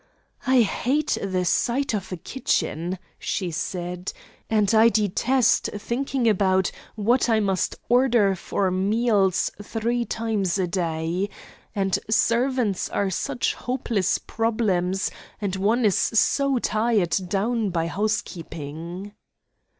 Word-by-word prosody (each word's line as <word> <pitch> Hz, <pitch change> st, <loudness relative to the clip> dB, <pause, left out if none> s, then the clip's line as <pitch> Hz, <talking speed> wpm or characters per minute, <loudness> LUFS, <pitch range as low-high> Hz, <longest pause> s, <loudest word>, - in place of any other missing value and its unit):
'I 260 Hz, -1 st, +5 dB
hate 275 Hz, +8 st, 0 dB
the 185 Hz, -2 st, -1 dB
sight 245 Hz, +8 st, +1 dB
of 200 Hz, -3 st, -3 dB
a 185 Hz, -, -3 dB
kitchen,' 175 Hz, -4 st, -2 dB, 0.2 s
she 185 Hz, -4 st, -2 dB
said, 180 Hz, +2 st, -4 dB, 0.4 s
'and 210 Hz, -2 st, +2 dB
I 225 Hz, +1 st, +7 dB
detest 225 Hz, +4 st, +2 dB
thinking 250 Hz, +3 st, -1 dB
about 190 Hz, -3 st, +2 dB, 0.2 s
what 235 Hz, +4 st, +2 dB
I 220 Hz, -1 st, +4 dB
must 195 Hz, -3 st, 0 dB
order 240 Hz, -5 st, +4 dB
for 185 Hz, +1 st, -1 dB
meals 200 Hz, 0 st, +2 dB
three 235 Hz, +3 st, -1 dB
times 215 Hz, -4 st, -1 dB
a 190 Hz, -, +1 dB
day. 170 Hz, +1 st, -1 dB, 0.5 s
And 195 Hz, -2 st, +1 dB
servants 230 Hz, -1 st, +1 dB
are 200 Hz, -1 st, 0 dB
such 245 Hz, +6 st, -1 dB
hopeless 235 Hz, -7 st, -1 dB
problems; 205 Hz, -5 st, 0 dB, 0.3 s
and 200 Hz, -3 st, -2 dB
one 220 Hz, +5 st, +2 dB
is 200 Hz, -, +3 dB
so 275 Hz, +4 st, +2 dB
tied 210 Hz, -6 st, +1 dB
down 215 Hz, +2 st, 0 dB
by 165 Hz, -2 st, -1 dB
housekeeping.' 170 Hz, -2 st, -4 dB
205 Hz, 115 wpm, -24 LUFS, 185-235 Hz, 0.5 s, I